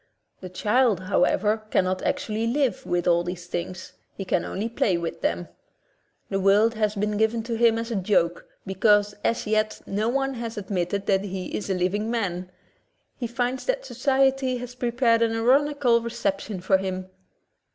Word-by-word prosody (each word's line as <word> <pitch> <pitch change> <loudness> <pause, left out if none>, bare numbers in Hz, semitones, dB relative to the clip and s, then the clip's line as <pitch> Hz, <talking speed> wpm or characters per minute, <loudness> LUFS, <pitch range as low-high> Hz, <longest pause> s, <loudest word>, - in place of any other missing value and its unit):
The 185 - -8
child, 210 +2 +2
however, 210 +3 +1
cannot 185 -2 +1
actually 220 +1 -1
live 265 +1 0
with 175 0 0
all 170 0 +4
these 175 0 -6
things 180 +1 -5
— - - -46
he 195 - -4
can 180 - +1
only 210 +4 -3
play 215 -5 +1
with 170 -1 -5
them. 85 +1 -1 0.8
The 195 - 0
world 205 +4 +4
has 215 -1 0
been 210 +1 -1
given 220 +1 +1
to 230 0 -3
him 225 0 +4
as 230 +1 -4
a - - -1
joke, 180 -3 +1 0.2
because 205 +2 +3
as 230 - 0
yet 215 0 0
no 210 +3 -1
one 270 +1 0
has 230 -2 -6
admitted 195 -1 -2
that 195 0 +1
he 190 -1 -5
is 205 - -4
a 190 - +1
living 195 +5 0
man. 185 -6 -2 0.7
He 240 - -4
finds 245 +2 -2
that - - 0
society 270 - +1
has 245 0 -7
prepared 240 -1 +1
an 225 -1 +2
ironical 255 0 +3
re 235 - -4
ception 200 -4 -3
for 190 0 +3
him. 185 -1 -4
215 Hz, 175 wpm, -25 LUFS, 190-235 Hz, 0.8 s, all